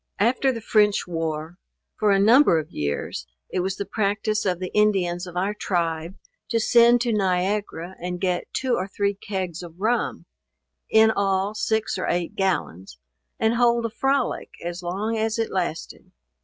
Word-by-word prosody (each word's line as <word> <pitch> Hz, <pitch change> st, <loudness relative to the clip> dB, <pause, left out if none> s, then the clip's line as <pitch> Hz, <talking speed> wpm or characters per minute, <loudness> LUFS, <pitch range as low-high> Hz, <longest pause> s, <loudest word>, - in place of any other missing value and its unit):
After 250 Hz, +5 st, +2 dB
the 230 Hz, -3 st, -5 dB
French 210 Hz, -2 st, +3 dB
war, 165 Hz, 0 st, -4 dB, 0.4 s
for 215 Hz, -, +1 dB
a 200 Hz, -, +5 dB
number 220 Hz, -, +6 dB
of 155 Hz, -1 st, -4 dB
years, 70 Hz, -1 st, -3 dB, 0.2 s
it -, -, -1 dB
was 190 Hz, +1 st, -1 dB
the 200 Hz, -, -4 dB
practice 215 Hz, +1 st, -1 dB
of 180 Hz, -2 st, +1 dB
the 185 Hz, -1 st, -5 dB
Indians 185 Hz, -4 st, +1 dB
of 180 Hz, 0 st, -8 dB
our 195 Hz, +3 st, 0 dB
tribe 170 Hz, -3 st, -2 dB, 0.3 s
to 230 Hz, -, +1 dB
send 235 Hz, +1 st, +5 dB
to 240 Hz, -2 st, 0 dB
Niagara 190 Hz, -2 st, -1 dB
and 180 Hz, 0 st, -4 dB
get 180 Hz, -1 st, -1 dB
two 260 Hz, -2 st, -1 dB
or 185 Hz, -3 st, 0 dB
three 200 Hz, 0 st, -1 dB
kegs 190 Hz, -4 st, -4 dB
of 170 Hz, 0 st, -11 dB
rum, 230 Hz, +4 st, 0 dB, 0.6 s
(in 220 Hz, 0 st, +6 dB
all 195 Hz, -1 st, 0 dB
six 220 Hz, 0 st, -1 dB
or -, -, -2 dB
eight 175 Hz, -1 st, -1 dB
gallons,) 95 Hz, -, -2 dB, 0.4 s
and 220 Hz, 0 st, +2 dB
hold 235 Hz, -1 st, +3 dB
a 230 Hz, -, -2 dB
frolic 270 Hz, +2 st, 0 dB, 0.2 s
as 175 Hz, +1 st, -4 dB
long 205 Hz, +6 st, -2 dB
as 220 Hz, +1 st, 0 dB
it 225 Hz, -1 st, -1 dB
lasted. 175 Hz, -4 st, -4 dB
195 Hz, 170 wpm, -24 LUFS, 175-220 Hz, 0.6 s, number